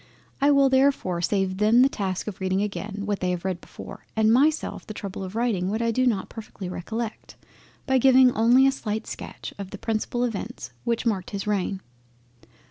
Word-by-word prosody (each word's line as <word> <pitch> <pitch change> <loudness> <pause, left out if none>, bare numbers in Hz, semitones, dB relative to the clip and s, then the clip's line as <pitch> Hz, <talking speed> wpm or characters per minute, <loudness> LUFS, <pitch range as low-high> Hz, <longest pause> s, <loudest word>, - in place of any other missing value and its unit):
It 285 +1 +5
will 275 -1 +5
therefore 265 -9 +2
be - - -4
saving 190 -2 0
them 220 +4 +5
the - - +6
task 190 -8 -3
of 205 -2 -6
reading 190 +1 +1
again 205 0 -4
what 205 -1 -1
they 180 - -1
have 180 0 -3
read 185 -2 -2
before, - - -11
and 220 0 +4
myself 300 +5 +2
the 215 - -7
trouble 195 -1 -6
of 190 +2 -7
writing 220 -6 0
what 215 +2 -1
I 230 0 +1
do 255 +3 +2
not 205 -6 0
perfectly 215 -4 -8
recollect, 220 +6 -5 0.5
by 265 -1 +3
giving 260 0 +6
only 240 +4 +5
a 270 - +5
slight 220 -5 -4
sketch - - -8
of 195 -2 -6
the - - -8
principal 225 +2 -2
Events 200 - -4
which 235 0 0
marked 200 -6 -1
his 200 -2 -4
reign. 200 -2 -1
215 Hz, 200 wpm, -25 LUFS, 190-245 Hz, 0.5 s, the